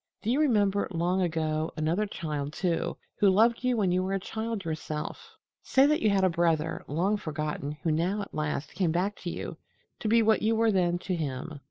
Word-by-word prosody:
"Do 220 - 0
you 265 - +2
remember, 205 -9 +2
long 180 +2 0
ago, 160 -2 0
another 165 +7 0
child, 150 -6 -4
too, 175 -2 -1 0.2
who 205 - +6
loved 230 +6 +3
you 250 -1 +2
when 195 -4 +2
you 180 +1 +2
were 190 +1 -2
a 195 - 0
child 220 0 -4
yourself? 155 -1 -5 0.3
Say 265 +1 +4
that 300 +1 +2
you 215 - +3
had 195 -1 +2
a - - +6
brother, 165 -2 0
long 185 +8 +1
forgotten, 150 -4 -3
who 165 - +1
now 180 +7 0
at - - -11
last 150 -1 -3
came 175 -2 +1
back 185 +5 0
to 175 - -5
you - - -5 0.4
to - - -3
be 230 +1 +4
what 220 0 +3
you 225 +1 +2
were 225 0 +3
then 175 -3 +2
to 180 +1 -3
him. 145 -1 -4
180 Hz, 210 wpm, -28 LUFS, 160-210 Hz, 0.4 s, who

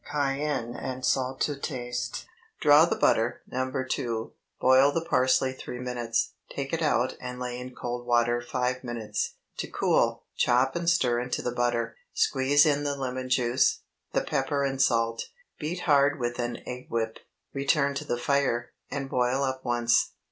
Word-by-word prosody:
Cayenne 140 -4 -1
and 130 0 -4
salt 130 0 0
to 145 - +1
taste. 125 -3 -4 0.3
Draw 150 +2 +7
the - - 0
butter 115 +2 +2
(No. 130 +1 -3 0.2
2); 115 -3 -2 0.3
boil 130 +2 +6
the 165 +3 -2
parsley 130 -3 +2
three 125 - -7
minutes; 120 -2 -1 0.2
take 140 +1 -5
it 165 - 0
out 125 -5 +1
and 125 0 -6
lay 125 -1 -4
in 125 0 -8
cold 120 0 -5
water 120 0 +2
five 125 +1 -2
minutes, 115 -4 -3 0.2
to - - -3
cool; - - +1
chop 130 +2 +2
and 170 0 +1
stir 125 -8 +2
into 125 +1 -3
the 125 - -1
butter; 120 -1 0 0.2
squeeze 140 +2 +4
in 145 -1 +2
the 145 -1 -1
lemon 130 -1 -4
juice, 125 0 +2 0.3
the - - +1
pepper 140 +1 -1
and 135 -1 0
salt; 115 -3 +2 0.3
beat 170 +4 -3
hard 145 -2 +3
with 120 0 -2
an 120 -1 -3
egg 125 +1 -6
whip, 110 -1 -2 0.3
return 140 +1 +2
to 140 +2 -4
the 120 - -2
fire, 120 -2 0 0.2
and 140 -2 -3
boil 125 +1 +1
up 130 -1 -2
once. 120 -1 +2
130 Hz, 165 wpm, -27 LUFS, 120-140 Hz, 0.3 s, Draw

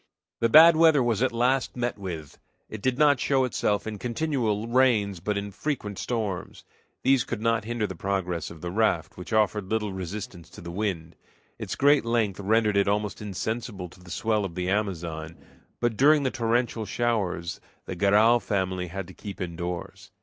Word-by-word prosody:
The 115 - +2
bad 160 +6 +9
weather 160 -4 +5
was 115 -2 0
at 130 - +2
last 125 +3 0
met 120 0 -1
with. 85 -7 -7 0.3
It 110 - -7
did 130 +2 0
not 145 -3 +4
show 135 -1 +2
itself 105 -4 0
in 110 -2 -5
continual 120 -4 -1
rains, 115 -6 +2
but 105 +4 -2
in 100 0 -4
frequent 105 -4 -4
storms. 110 -7 -3 0.4
These 135 -2 +4
could 120 - -4
not 115 -1 0
hinder 120 -1 -1
the - - -5
progress 90 -4 -2
of 80 -2 -12
the 85 - -4
raft, 100 -5 0
which 90 - -9
offered 105 -3 +1
little 105 -3 -1
resistance 95 -1 -7
to - - -12
the 85 0 -7
wind. 85 -4 -3 0.4
Its - - -4
great 145 +1 +4
length 115 -5 0
rendered 105 +1 +2
it 100 - +3
almost 105 +1 -1
insensible 105 -1 -4
to 90 - -18
the 90 -1 -15
swell 110 +4 0
of 90 -4 -5
the 90 0 -1
Amazon, 85 -6 -3 0.4
but 120 -3 0
during 145 +2 +5
the 130 - 0
torrential 115 -2 0
showers 100 -8 -1 0.2
the - - -5
Garral 105 +5 +4
family 95 -3 -2
had 95 +1 -6
to 95 - -12
keep 100 0 -9
indoors. 85 0 -5
105 Hz, 180 wpm, -26 LUFS, 95-120 Hz, 0.4 s, bad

